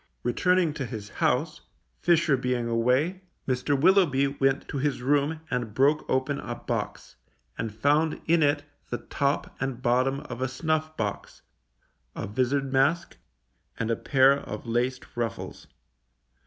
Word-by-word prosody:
Returning 175 +6 +2
to 135 -4 -4
his 105 -4 -7
house, - - 0 0.4
Fisher 165 -4 +3
being 125 -2 -1
away, 125 +11 +1 0.3
Mr. 135 +2 0
Willoughby 165 -5 +4
went 135 0 0
to 140 - -3
his 145 -1 0
room 145 +3 +1
and 120 -4 -2
broke 145 +3 +2
open 130 +2 0
a - - -5
box, - - -5 0.4
and 115 -1 -3
found 145 +8 +1
in 165 0 +3
it 145 0 +2 0.3
the 120 - -2
top 140 +3 -2
and 135 -2 -2
bottom 130 +2 +1
of 125 -4 -8
a 130 - +1
snuff 155 +4 -2
box, 105 -2 -4 0.7
a - - -4
vizard 130 +5 0
mask, 150 +6 +1 0.6
and 115 0 -1
a - - +2
pair 135 +2 +4
of 115 -6 -6
laced 125 +2 -1
ruffles. 120 -1 -4
135 Hz, 140 wpm, -27 LUFS, 125-150 Hz, 0.7 s, Willoughby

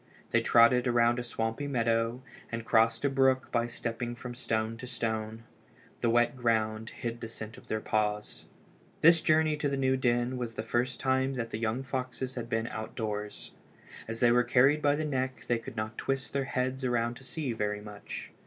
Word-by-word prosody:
They - - +4
trotted 120 +2 +5
around 120 0 +3
a - - -3
swampy 115 +3 -2
meadow 115 -1 0 0.3
and 115 -1 -4
crossed 115 +2 +3
a - - +5
brook 135 -1 +2
by 120 -1 +1
stepping 120 0 -4
from 125 0 -7
stone 115 -2 -1
to 125 - -8
stone. 110 -2 -3 0.6
The 120 - +1
wet 120 +2 +3
ground 110 -2 0
hid 120 0 -5
the - - -4
scent 110 -1 -8
of - - -15
their 110 0 -2
paws. 105 -1 -1 0.6
This 165 +1 +7
journey 155 0 +3
to 150 -1 0
the 140 - -1
new 130 -1 +2
den 125 0 +1
was 120 -2 -4
the 110 - -3
first 120 +2 -1
time 130 0 +1
that 115 -2 -3
the 110 - -3
young 115 +3 -1
foxes 130 0 -3
had 120 -2 -5
been 115 -1 0
outdoors. 105 -1 -5 0.6
As 115 +2 -5
they 120 -1 +6
were 120 +1 +5
carried 135 +5 +4
by 145 -1 +3
the 155 +1 -2
neck 130 -3 -2
they 120 -1 +2
could 125 +1 -9
not 110 +1 -3
twist 135 -1 -2
their 140 -1 0
heads 130 0 -2
around 120 -2 +1
to - - -13
see 130 0 -3
very 105 -1 -1
much. 105 -1 -8
120 Hz, 195 wpm, -30 LUFS, 115-130 Hz, 0.6 s, This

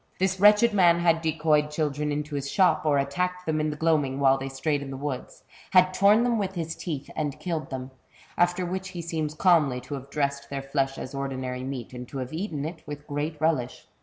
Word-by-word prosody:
This 190 0 0
wretched 210 +3 +6
man 175 -4 +5
had 165 -1 +3
decoyed 155 -2 +2
children 150 -1 -1
into 150 +1 -3
his 140 -1 -3
shop, 170 -5 +3
or 145 -1 +4
attacked 180 +6 -1
them 155 -1 0
in 155 - 0
the 150 - -3
gloaming 150 -4 +1
when 135 -1 +5
they 135 0 -4
strayed 140 +2 -1
in 140 - -6
the 135 - -5
woods, 140 -2 -5 0.3
had 185 0 +6
torn 205 +4 +5
them 240 -2 +1
with 195 -1 -2
his 165 -1 -3
teeth, 145 -5 -5
and 150 -3 -3
killed 165 -4 -3
them, 130 0 -6 0.4
after 175 +1 +2
which 185 +1 -4
he 180 -2 -6
seems 155 -2 -3
calmly 155 -7 +3
to 135 - -8
have 135 0 -6
dressed 140 -1 -2
their 140 -1 -4
flesh 135 -1 -1
as 130 - -7
ordinary 130 -2 -4
meat, 130 -2 -6
and 125 0 -7
to 140 - -7
have 130 +2 -5
eaten 160 -4 -3
it 160 +1 -6
with 145 0 -7
great 150 +2 -3
relish. 150 -6 0
150 Hz, 220 wpm, -26 LUFS, 140-175 Hz, 0.4 s, wretched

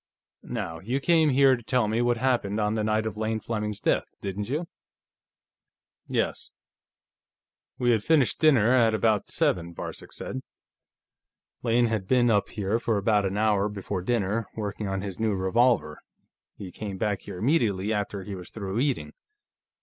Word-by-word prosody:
Now, 95 -9 -5
you 120 +9 -2
came 160 +1 +4
here 135 -1 +5
to 120 - -9
tell 120 0 +1
me 110 +3 0
what 120 0 +2
happened 115 -5 0
on 105 0 +1
the 110 -1 -1
night 110 +1 +1
of 110 -1 -4
Lane 110 0 -1
Fleming's 105 -2 -3
death, - - +1
didn't 100 +2 -4
you?" 155 +5 -2 1.4
"Yes. - - -2 1.3
We 120 -1 +2
had 110 -3 +2
finished 150 -4 +2
dinner 130 -8 +5
at 115 -3 +4
about 110 -2 +1
seven," 85 -1 0
Varcek - - -7
said. 130 - -6 1.2
"Lane 120 0 +3
had 110 -5 -1
been 120 0 +4
up 105 -2 +2
here 105 +2 -1
for 115 -2 0
about 105 0 +2
an 95 +2 -3
hour 105 -1 +2
before 100 -2 -4
dinner, 110 +1 0
working 105 -1 -4
on 95 0 -2
his 100 -1 -6
new 110 -2 +1
revolver; 95 -4 +2 0.6
he 95 -3 -8
came 100 -1 -6
back 105 -1 -1
here - - -8
immediately 110 - +1
after 100 -2 -3
he 100 - -7
was 90 -2 -8
through 100 0 -4
eating. 135 0 -1
110 Hz, 165 wpm, -26 LUFS, 100-120 Hz, 1.4 s, here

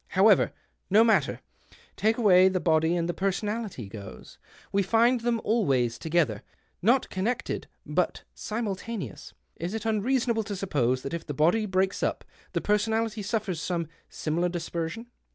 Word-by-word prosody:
However, 200 +1 +5 0.4
no 215 +4 +6
matter! 205 -11 +2 0.5
Take 220 +2 +1
away 190 -5 +6
the 185 -1 0
liody 160 0 +2
and 170 -1 0
the 175 - -1
personality 195 - -2
goes. 100 -1 -10 0.3
We 200 - +2
find 235 +5 +3
them 235 -1 +1
always 135 - +1
together 155 -10 +1 0.2
— - - -43
not 260 0 +1
con 190 +1 -2
nected, 245 +2 -2 0.2
but - - -1
simultaneous. 210 - -5 0.2
Is 175 +6 -4
it 220 0 -4
unreasonable 230 +1 +1
to 205 -1 -4
suppose 130 -10 0
that 135 - -5
if 170 -1 -5
the 145 - -4
body 175 +9 +3
breaks 190 0 0
up - - -1 0.3
the - - 0
personality 220 +1 0
suffers 200 -5 -2
some 170 -3 -2 0.2
similar 170 +3 -1
dispersion 170 +4 -4
195 Hz, 155 wpm, -27 LUFS, 165-225 Hz, 0.5 s, no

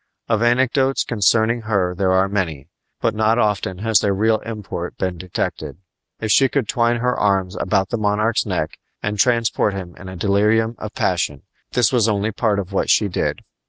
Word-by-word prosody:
Of 110 -2 +1
anecdotes 130 +3 +2
concerning 115 +2 +2
her 100 -5 0
there 95 +1 0
are 95 +1 +3
many, 85 -9 -3 0.3
but 115 - +1
not 110 +1 +2
often 105 -5 0
has 110 -3 +4
their 100 -1 0
real 110 +2 +2
import 105 -6 -6
been 90 -2 -3
detected. 90 -2 -4 0.4
If 110 -1 -1
she 135 +3 +5
could 135 -6 -1
twine 120 +2 +1
her 125 0 +1
arms 95 -2 +1
about 95 -3 0
the 120 - -2
monarch's 105 +2 +1
neck 90 -5 -3 0.2
and 105 0 -2
transport 115 -3 +2
him 90 -3 -7
in 95 - -9
a 95 - -8
delirium 105 +5 +2
of 105 0 -7
passion, 85 -6 -1 0.3
this 125 +1 +2
was 115 -3 +3
only 105 +1 0
part 110 -1 0
of 100 -1 -4
what - - 0
she 105 - +3
did. - - -2
105 Hz, 185 wpm, -20 LUFS, 95-115 Hz, 0.4 s, she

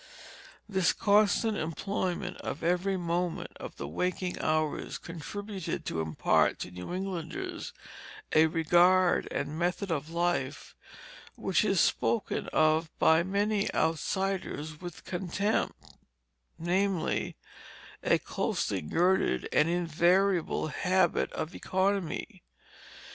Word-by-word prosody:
This 190 -4 +2
constant 210 +1 +3
employment 180 +2 -2
of - - -5
every 180 +3 +1
moment 175 0 -2
of - - -8
the 70 - -6
waking 180 - -2
hours 155 -1 0
contributed 190 +3 -6
to 80 - -2
impart 80 -1 +2
to 90 - -5
New 90 - -7
Englanders 195 - -4 0.6
a 160 +1 +6
regard 175 +3 +4
and 155 +2 -3
method 180 +2 -1
of 155 -1 -2
life 170 -5 -1 0.6
which - - +1
is - - +2
spoken - - +1
of 155 +1 +2
by 160 +1 +5
many 200 +3 0
outsiders 165 -1 -1
with 175 -2 -8
contempt, 190 +4 -1 0.8
namely, 185 +1 0 0.7
a - - +3
closely - - -2
girded 175 - +1
and 150 - +4
invariable 175 0 +2
habit 185 +2 +1
of 160 +1 -4
economy. 190 -3 -1
175 Hz, 105 wpm, -30 LUFS, 160-195 Hz, 0.8 s, a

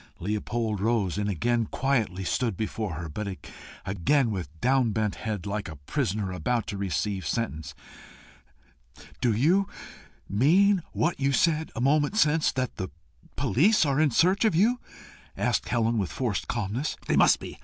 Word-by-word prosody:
Leopold 105 +2 -2
rose, 105 -3 0
and 105 0 -1
again 120 +6 +1
stood - - -15
quietly 115 -9 0 0.3
before 110 -4 -3
her, 85 +1 -5
but 95 +4 -5 0.5
again 115 - +1
with 90 -8 -4
downbent 115 -3 +1
head, 105 -4 -4
like 100 0 -3
a 80 - -8
prisoner 100 - -2
about 120 +5 -1
to 100 - -5
receive 100 0 -2
sentence. 80 -10 -3 1.5
"Do 120 - +3
you 170 - +3 0.6
mean 180 - +4
what 170 +2 0
you 140 0 +2
said 160 +2 +1
a 115 - -3
moment 145 +8 +2
since 155 -4 +3
that 130 -1 -3
the 95 - -4 0.5
police 170 - +3
are 140 +1 +2
in 155 - +4
search 180 - +3
of 220 -6 +3
you?" 230 +8 +3 0.6
asked - - 0
Helen, 115 -1 +1
with 95 -4 -2
forced 115 -7 -2
calmness. 115 +5 -2
"They - - +1
must - - +5
be. - - -9
115 Hz, 155 wpm, -27 LUFS, 100-145 Hz, 1.5 s, must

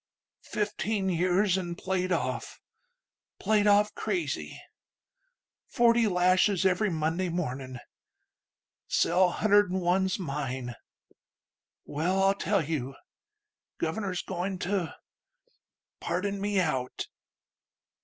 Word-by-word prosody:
Fifteen 210 -1 -1
years, 185 +2 +2
an' 175 -2 -4
played 185 0 -2
off... 170 - -2 0.8
played 210 -1 +2
off 205 +1 +4
crazy.... 355 -3 -3 1.1
Forty 235 -2 +4
lashes 185 +1 +3
every 190 +3 +2
Monday... 165 +2 -1
mornin'.... 130 -7 -4 1.1
Cell 180 +2 +3
hunder'd'n 205 -3 +3
one's 185 +1 +1
mine.... 135 - -4 1.1
Well, 180 +6 0
I'll 195 0 +5
tell 200 -3 0
you: 135 -4 -3 0.8
Governor's 180 +2 -2
goin' 185 +1 -3
to... 190 -4 -1 1.0
pardon 200 +2 -2
me 205 -1 +1
out." 130 -8 -1
185 Hz, 90 wpm, -28 LUFS, 165-200 Hz, 1.1 s, I'll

